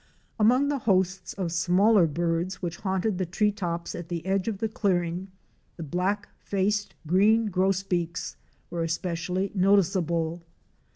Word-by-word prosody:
Among 250 +6 +4
the 285 -1 0
hosts 190 -4 0
of 185 -4 -3
smaller 185 +3 +4
birds 170 +4 -1
which 170 -2 -4
haunted 190 0 -1
the 185 - 0
tree 210 +4 +1
tops 170 -5 -4
at 170 -1 -7
the 170 -1 -4
edge 190 +1 0
of 220 -3 -1
the 225 - -1
clearing, 185 -4 -1 0.5
the 170 - -5
Black 185 +7 -1
faced 200 +1 -1
Green 210 +6 +3
Gros 190 +1 +1
beaks 170 -3 -2 0.4
were 170 - -2
especially 175 +3 -2
noticeable. 175 -4 +2
185 Hz, 140 wpm, -27 LUFS, 170-200 Hz, 0.5 s, Among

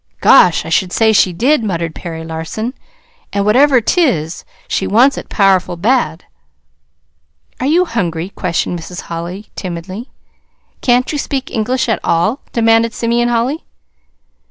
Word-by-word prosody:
"Gosh! 180 -10 +5
I - - -6
should 180 +2 +1
say 220 +2 +3
she 190 -3 +4
did," 245 - +1
muttered 170 -5 -2
Perry 165 -1 -7
Larson. 165 +9 -5 0.6
"An' 200 0 0
whatever 260 +5 +5
't 355 - +1
is, 165 - 0 0.2
she - - -1
wants 255 +7 +4
it - - -8
powerful 185 -3 +2
bad." 180 -5 0 1.3
"Are 260 - -1
you 345 +5 +3
hungry?" 175 - -2
questioned 175 -2 -2
Mrs. 175 +2 -8
Holly 175 +5 -7
timidly. 185 +6 -6 0.7
"Can't 250 0 +2
you 295 - -2
speak 270 -2 -3
English 245 +3 -1
at 225 - 0
all?" 190 +10 +1
demanded 225 0 +2
Simeon 240 +1 +1
Holly. 240 +6 -1
215 Hz, 140 wpm, -15 LUFS, 175-245 Hz, 1.3 s, Gosh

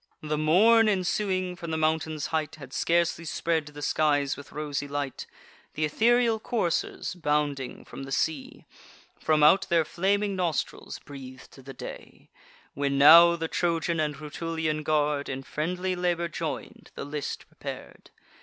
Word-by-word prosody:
The 150 0 -1
morn 215 +9 +5
ensuing, 185 -1 0
from 170 -1 -7
the 160 - -1
mountain's 155 -1 0
height, 155 -1 -1
Had 135 -3 -12
scarcely 170 0 +1
spread 160 -1 -1
the 145 0 -9
skies 145 -2 +1
with 145 - -12
rosy 145 -1 -3
light; 145 -1 -4 0.5
Th' 155 - -4
ethereal 225 +8 +3
coursers, 215 -9 -2
bounding 150 -6 -2
from - - -9
the 135 0 -8
sea, 150 0 -2 0.5
From 155 -1 +2
out 165 +6 +5
their 165 -2 +3
flaming 200 +4 0
nostrils 175 -5 -2
breath'd 130 -2 -12
the 135 - -8
day; - - -10 0.4
When 140 0 -1
now 170 +4 +9
the 165 -1 -3
Trojan 170 0 0
and 150 -1 0
Rutulian 155 +1 -3
guard, 150 -2 0
In 135 0 -4
friendly 180 +6 -2
labour 175 -1 -1
join'd, - - -6
the - - -5
list 145 0 -5
prepar'd. - - -9
155 Hz, 145 wpm, -27 LUFS, 145-175 Hz, 0.5 s, now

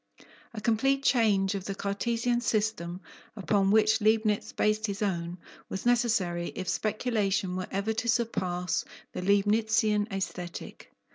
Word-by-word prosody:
A - - -3
complete 270 +5 +1
change 210 -7 +3
of 195 -2 -4
the 195 - -3
Cartesian 235 +5 -1
system, 210 -6 -1 0.3
upon 195 0 +1
which 215 +1 +4
Leibnitz 215 -1 +2
based 215 +1 +1
his 200 +1 -3
own, 175 -3 -2 0.3
was 190 - -5
necessary, 220 -8 +1
if 185 - -5
speculation 205 -2 0
were 185 0 -3
ever 200 +3 -1
to 235 +2 -2
surpass 185 -6 0 0.3
the - - -4
Leibnitzian 210 +2 +2
aesthetic. 180 -3 -6
210 Hz, 130 wpm, -28 LUFS, 190-220 Hz, 0.3 s, which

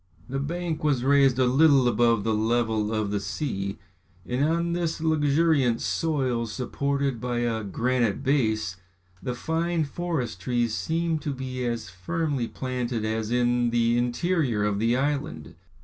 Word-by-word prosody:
The 135 +2 -3
bank 165 +2 -3
was 140 -5 +1
raised 135 -2 +4
a 130 - +3
little 135 0 +5
above 120 -3 +3
the 110 - +1
level 110 -1 +1
of 110 -2 -1
the 105 - 0
sea, 100 -5 -3 0.5
and 125 +3 0
on 170 +2 +1
this 170 -2 -1
luxuriant 150 -5 +2
soil 130 -7 0
supported 135 +2 -2
by 120 -1 -1
a 115 -2 -1
granite 120 +2 0
base, 110 -9 +1 0.4
the 125 - -3
fine 165 +4 0
forest 140 - -3
trees 120 0 0
seemed 165 +2 -1
to 150 - -2
be 130 -1 -4
as 115 -5 -3
firmly 130 - -2
planted 125 -3 -3
as 110 0 -2
in 120 0 +2
the 115 0 +2
interior 125 - 0
of 105 -1 0
the 115 +3 +2
island. 145 +4 -2
125 Hz, 150 wpm, -26 LUFS, 115-150 Hz, 0.5 s, little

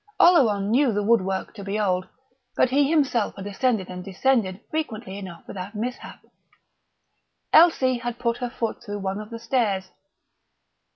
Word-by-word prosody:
Oleron 215 - +5
knew 260 +1 +4
the 205 -1 -1
woodwork 195 -3 +1
to 205 -3 -9
be 200 +2 -2
old, 185 -3 0 0.5
but 255 - +3
he 280 +1 +3
himself 275 -9 +1
had 195 - -8
ascended 205 -1 0
and 180 0 -7
descended 195 0 0
frequently 230 -10 -4
enough 185 -4 -8
without 195 +2 -7
mishap.... 245 +4 -6 1.3
Elsie 265 -7 +5
had 240 0 -4
put 235 -1 -1
her 245 - -3
foot 230 -1 -4
through 205 -3 -5
one 195 +1 -3
of 210 - -10
the 230 - -6
stairs. 225 -6 -1
220 Hz, 155 wpm, -24 LUFS, 195-250 Hz, 1.3 s, Oleron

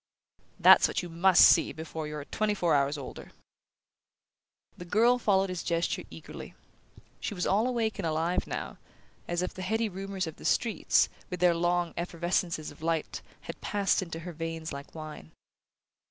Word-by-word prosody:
"That's - - +8
what - - -2
you 175 - -6
must 175 +2 +6
see 165 - +5
before 160 -1 -6
you're 150 -1 -6
twenty 215 +4 -1
four 175 -4 +1
hours 140 +1 +2
older!" 140 - -9 1.4
The - - -9
girl 230 +7 +3
followed 195 -4 +2
his 180 -2 -3
gesture 170 0 -1
eagerly. - - -10 0.6
She 205 - -4
was 180 - -2
all 215 +5 +2
awake 230 -4 -1
and - - -2
alive 160 +3 0
now, - - -5 0.5
as 175 +1 -1
if 180 - -3
the 185 - -8
heady 220 +4 0
rumours 195 0 -4
of 160 - -8
the - - -13
streets, 230 -4 +2 0.2
with 180 - -5
their 180 -1 +5
long 175 0 0
effervescences 170 -1 -1
of 145 - -16
light, 165 -1 -2 0.2
had - - -9
passed 200 -1 +1
into 165 -3 -6
her 175 +1 -7
veins 165 -1 -5
like 140 +3 -9
wine. 155 - -9
175 Hz, 170 wpm, -29 LUFS, 160-195 Hz, 1.4 s, That's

